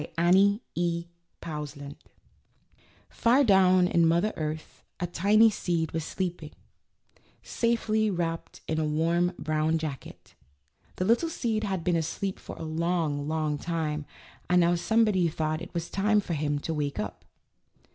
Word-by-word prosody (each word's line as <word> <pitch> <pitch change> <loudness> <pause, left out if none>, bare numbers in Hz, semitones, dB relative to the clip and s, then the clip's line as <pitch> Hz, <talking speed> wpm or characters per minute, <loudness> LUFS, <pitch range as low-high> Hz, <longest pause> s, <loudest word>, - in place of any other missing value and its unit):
BY - - -7
ANNIE 195 +5 +4
E. 170 0 -1 0.4
POUSLAND. 145 -2 -6 1.1
Far 250 +5 +3
down 185 -5 +5
in 170 -2 +3
Mother 170 +6 +2
Earth 155 0 -5 0.2
a 175 - -1
tiny 210 +6 +4
seed 170 -5 -1
was 165 -1 -2
sleeping, 175 -3 -4 0.9
safely 220 -2 0
wrapped 170 -3 -3
in 160 0 -1
a - - +1
warm, 165 +4 +1
brown 155 +1 0
jacket. 155 -5 -7 0.6
The 185 - -1
little 235 - +2
seed 225 -8 -1
had 190 -4 -2
been 180 0 +1
asleep 170 +4 -2
for - - -9
a - - -8
long, 160 -2 -1
long 155 -2 -1
time, 155 -3 -3 0.4
and 180 0 +5
now 170 +1 +3
somebody 190 0 +2
thought 155 0 -2
it - - -8
was 170 0 -2
time 210 +2 +2
for 185 -4 -3
him 145 -1 -1
to 165 - -3
wake 145 -2 -2
up. 105 -4 -5
170 Hz, 145 wpm, -27 LUFS, 155-190 Hz, 1.1 s, down